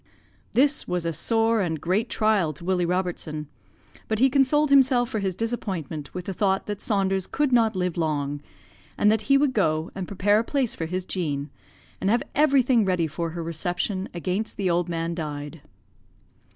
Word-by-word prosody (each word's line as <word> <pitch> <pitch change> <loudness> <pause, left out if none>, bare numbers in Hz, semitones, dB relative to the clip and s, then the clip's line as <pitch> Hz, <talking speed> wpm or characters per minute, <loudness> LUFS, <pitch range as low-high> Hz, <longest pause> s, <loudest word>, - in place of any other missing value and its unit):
"This 285 +3 +2
was 180 -1 -2
a 165 - -1
sore 225 +6 +1
and 165 -4 -1
great 190 +8 0
trial 210 -8 +2
to 160 +4 -12
Willie 180 -2 +1
Robertson, 175 -4 -2 0.6
but 220 - 0
he 265 +4 +4
consoled 280 +2 +3
himself 255 -3 +5
for 220 - -2
his 190 -3 -2
disappointment 185 - -4
with 180 -1 -6
the 195 - -3
thought 190 0 +1
that 205 -1 -5
Saunders 195 -2 0
could 295 -2 0
not 225 -3 +3
live 180 -2 -1
long, 145 -3 -1 0.6
and 210 - +4
that 220 0 +1
he 275 - +7
would 280 -2 +2
go 155 -7 0
and 190 -2 -5
prepare 205 +2 +2
a - - 0
place 265 -1 0
for 165 - -4
his 180 +2 -3
Jean, 150 -7 -3 0.5
and 190 - +1
have 235 +3 +2
everything 265 -5 +4
ready 180 -4 +1
for 165 +2 -3
her 170 +1 -5
reception 175 +4 -2
against 185 +5 -3
the 190 -3 +1
old 175 +1 0
man 165 0 -2
died. 150 -1 -6
190 Hz, 180 wpm, -25 LUFS, 165-225 Hz, 0.6 s, he